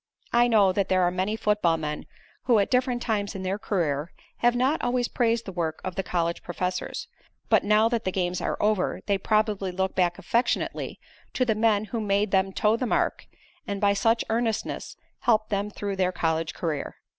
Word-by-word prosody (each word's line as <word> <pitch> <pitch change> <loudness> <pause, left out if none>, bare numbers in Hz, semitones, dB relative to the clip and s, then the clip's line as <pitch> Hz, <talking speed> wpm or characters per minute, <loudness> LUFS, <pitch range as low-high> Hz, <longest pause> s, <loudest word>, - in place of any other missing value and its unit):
I 240 0 +5
know 210 -5 +5
that 200 0 0
there 185 -1 +3
are 175 - +3
many 190 +4 -1
football 210 -7 +2
men 150 -1 -4 0.4
who 235 -2 +4
at 200 - +1
different 250 -1 +1
times 205 -3 -1
in 190 - -5
their 190 +2 -2
career 165 -7 -1 0.3
have 240 0 +3
not 260 +5 +1
always 245 0 +1
praised 230 -1 0
the 195 - -5
work 165 -3 -2
of 185 - -3
the 195 - -1
college 170 -2 -1
professors, 180 +1 -3 0.4
but - - +4
now 210 +2 +4
that 230 -1 -1
the 185 - -1
games 180 -1 -1
are - - -1
over 210 -3 +1
they 200 -2 +1
probably 210 -2 +1
look 190 +1 -1
back 175 -2 +1
affectionately 235 +2 -1 0.3
to 255 - +1
the 225 - +2
men 215 -1 +2
who 230 - 0
made 200 0 +1
them 190 0 +2
toe 210 +3 +2
the 250 +2 -2
mark, - - 0 0.4
and 200 -1 -3
by 200 0 +3
such 225 +3 +2
earnestness 225 -1 -2 0.2
helped 220 -3 +2
them 200 0 0
through 200 -1 -4
their 185 -1 +2
college 160 -2 -1
career. 155 -4 -3
200 Hz, 195 wpm, -26 LUFS, 185-225 Hz, 0.4 s, I